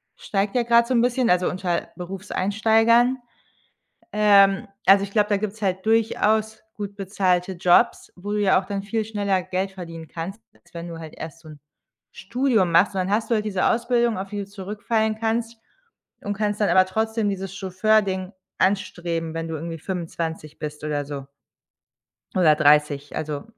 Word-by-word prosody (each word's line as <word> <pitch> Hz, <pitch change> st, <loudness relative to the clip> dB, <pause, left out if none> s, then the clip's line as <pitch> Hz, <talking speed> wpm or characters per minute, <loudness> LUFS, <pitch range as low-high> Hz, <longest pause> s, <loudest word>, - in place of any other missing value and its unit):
steigt 200 Hz, +2 st, -2 dB
ja 245 Hz, -, +3 dB
grad 235 Hz, 0 st, +4 dB
so 260 Hz, -, 0 dB
'n 235 Hz, -, +4 dB
bisschen 245 Hz, 0 st, +1 dB
also 180 Hz, 0 st, +3 dB
unter 180 Hz, -2 st, -2 dB
Berufseinsteigern. 220 Hz, +6 st, +2 dB, 1.0 s
Ähm, 200 Hz, -2 st, +5 dB, 0.2 s
also 195 Hz, +1 st, +6 dB
ich 200 Hz, -, -8 dB
glaube, 210 Hz, -1 st, +2 dB
da 205 Hz, -, +3 dB
gibt's 215 Hz, +1 st, -5 dB
halt 190 Hz, +1 st, -1 dB
durchaus 220 Hz, -1 st, +1 dB
gut 200 Hz, -1 st, -6 dB
bezahlte 190 Hz, -2 st, 0 dB
Jobs, 180 Hz, +6 st, +2 dB
wo 205 Hz, +3 st, -6 dB
du 210 Hz, -, 0 dB
ja 190 Hz, -2 st, +4 dB
auch 190 Hz, -, -11 dB
dann 200 Hz, 0 st, -3 dB
viel 220 Hz, +2 st, -2 dB
schneller 200 Hz, -3 st, -1 dB
Geld 185 Hz, +2 st, -3 dB
verdienen 165 Hz, -3 st, -9 dB
kannst, 185 Hz, +6 st, -6 dB
als -, -, -27 dB
wenn 170 Hz, +1 st, -6 dB
du 165 Hz, -, -7 dB
halt 160 Hz, -1 st, -9 dB
erst 165 Hz, +1 st, -8 dB
so 160 Hz, -, -15 dB
'n 150 Hz, -, -13 dB, 0.5 s
Studium 230 Hz, -5 st, 0 dB
machst. 185 Hz, +5 st, +4 dB
Und -, -, -2 dB
dann 185 Hz, -, -2 dB
hast 220 Hz, +3 st, 0 dB
du -, -, +4 dB
halt 210 Hz, -, -1 dB
diese 190 Hz, -3 st, 0 dB
Ausbildung, 235 Hz, -2 st, +1 dB
auf 195 Hz, 0 st, -6 dB
die 205 Hz, -, -5 dB
du 200 Hz, -, -4 dB
zurückfallen 210 Hz, +2 st, -2 dB
kannst 230 Hz, +1 st, -1 dB, 0.7 s
und 205 Hz, -1 st, -3 dB
kannst 210 Hz, 0 st, -2 dB
dann 210 Hz, -, +3 dB
aber 185 Hz, +1 st, +5 dB
trotzdem 220 Hz, +2 st, -1 dB
dieses 195 Hz, -1 st, -5 dB
Chauffeur-Ding 190 Hz, 0 st, +1 dB, 0.3 s
anstreben, 175 Hz, -4 st, -1 dB
wenn 165 Hz, 0 st, -3 dB
du 160 Hz, -, -4 dB
irgendwie 165 Hz, +1 st, -6 dB
25 165 Hz, -3 st, -5 dB
bist 150 Hz, -1 st, -6 dB
oder 145 Hz, -1 st, -2 dB
so 140 Hz, -2 st, -6 dB, 1.1 s
oder 155 Hz, -5 st, +5 dB
30, 150 Hz, -1 st, +3 dB
also 150 Hz, -2 st, -4 dB
195 Hz, 175 wpm, -23 LUFS, 175-215 Hz, 1.1 s, also